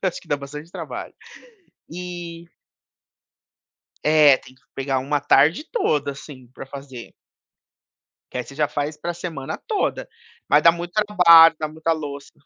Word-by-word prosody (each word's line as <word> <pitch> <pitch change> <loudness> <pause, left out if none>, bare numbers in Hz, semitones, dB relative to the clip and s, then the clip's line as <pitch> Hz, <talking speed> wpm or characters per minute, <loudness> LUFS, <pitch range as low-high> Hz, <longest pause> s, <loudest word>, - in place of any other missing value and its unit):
eu 190 - +2
acho 175 - -7
que 170 - -22
dá 145 - +1
bastante 150 +4 -9
trabalho. - - -7 0.8
E 175 -1 -8 1.6
É, 150 -3 +6
tem 130 - -17
que - - -30
pegar 135 -1 -1
uma 145 +2 -1
tarde 150 - +3
toda, 150 - 0
assim, 135 -2 -12
para - - -9
fazer. 135 -3 -10 1.2
Que - - -5
aí 125 - -3
você 135 - -13
já 150 -1 +1
faz 150 +1 -4
para 175 +3 -4
semana 160 -6 -6
toda, - - -2 0.4
mas 150 - +5
dá 170 - +8
muito 175 +1 -6
trabalho, 175 -6 +6
dá 155 - -2
muita 160 +2 -2
louça. 145 -2 -7
150 Hz, 155 wpm, -22 LUFS, 140-170 Hz, 1.6 s, dá